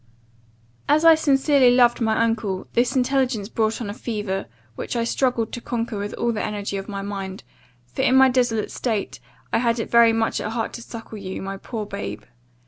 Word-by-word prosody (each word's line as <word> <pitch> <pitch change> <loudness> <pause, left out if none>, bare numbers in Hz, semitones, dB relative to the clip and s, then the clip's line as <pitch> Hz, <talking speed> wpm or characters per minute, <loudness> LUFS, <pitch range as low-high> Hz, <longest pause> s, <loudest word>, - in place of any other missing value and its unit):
"As 305 +3 +4
I 330 - +10
sincerely 280 -3 +4
loved 245 -1 +4
my 225 0 +2
uncle, 220 -5 -1
this 245 +3 +1
intelligence 255 -5 +1
brought 220 -1 0
on 225 - -4
a 200 - -4
fever, 205 - -4 0.3
which - - -5
I 235 - +1
struggled 235 -2 0
to 240 - -5
conquer 230 -3 -3
with 205 +1 -4
all 235 - 0
the 215 - -2
energy 205 -1 -3
of 195 +1 -6
my 200 -1 -4
mind; 195 -1 -6 0.4
for, 125 - -5
in 260 - +3
my 265 0 +7
desolate 245 -4 +1
state, 220 -5 -3 0.3
I - - +3
had 235 0 +1
it 225 - -4
very 235 -1 +6
much 225 0 0
at 215 - -4
heart 225 -1 -2
to 235 - -7
suckle 225 -2 -9
you, 190 -1 -6
my 195 0 -5
poor 220 +1 -5
babe. 105 - -6
225 Hz, 200 wpm, -23 LUFS, 205-245 Hz, 0.4 s, I